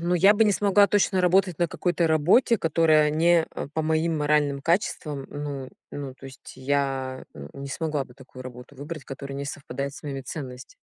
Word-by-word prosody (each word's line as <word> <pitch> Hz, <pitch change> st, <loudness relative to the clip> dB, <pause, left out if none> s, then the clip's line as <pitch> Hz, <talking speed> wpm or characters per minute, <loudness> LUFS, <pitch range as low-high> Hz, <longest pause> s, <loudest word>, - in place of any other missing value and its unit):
Ну 175 Hz, +1 st, 0 dB
я 195 Hz, +4 st, +6 dB
бы 225 Hz, -, +4 dB
не 210 Hz, -, +3 dB
смогла 200 Hz, 0 st, +4 dB
точно 195 Hz, -2 st, +2 dB
работать 180 Hz, -1 st, +2 dB
на 175 Hz, -, +1 dB
какой-то 175 Hz, 0 st, 0 dB
работе, 175 Hz, -, +4 dB
которая 155 Hz, -2 st, +3 dB
не, 165 Hz, +1 st, +3 dB
а, -, -, -6 dB
по 160 Hz, -, -1 dB
моим 160 Hz, +1 st, 0 dB
моральным 145 Hz, -2 st, +1 dB
качествам. 150 Hz, -4 st, -1 dB
Ну, 145 Hz, -2 st, -5 dB, 0.2 s
ну, 140 Hz, -2 st, -6 dB
то 135 Hz, -, -12 dB
есть 135 Hz, 0 st, -12 dB
я, 135 Hz, -1 st, -1 dB
э, 70 Hz, 0 st, -9 dB
не 140 Hz, 0 st, -7 dB
смогла 150 Hz, 0 st, -2 dB
бы 125 Hz, -, -18 dB
такую 130 Hz, -1 st, -12 dB
работу 125 Hz, +2 st, -11 dB
выбрать, 145 Hz, +2 st, -7 dB
которая 140 Hz, 0 st, -7 dB
не 140 Hz, -, -4 dB
совпадает 140 Hz, -1 st, -5 dB
с -, -, -11 dB
моими 140 Hz, -3 st, -5 dB
ценность. 130 Hz, -1 st, -8 dB
150 Hz, 195 wpm, -25 LUFS, 135-170 Hz, 0.2 s, я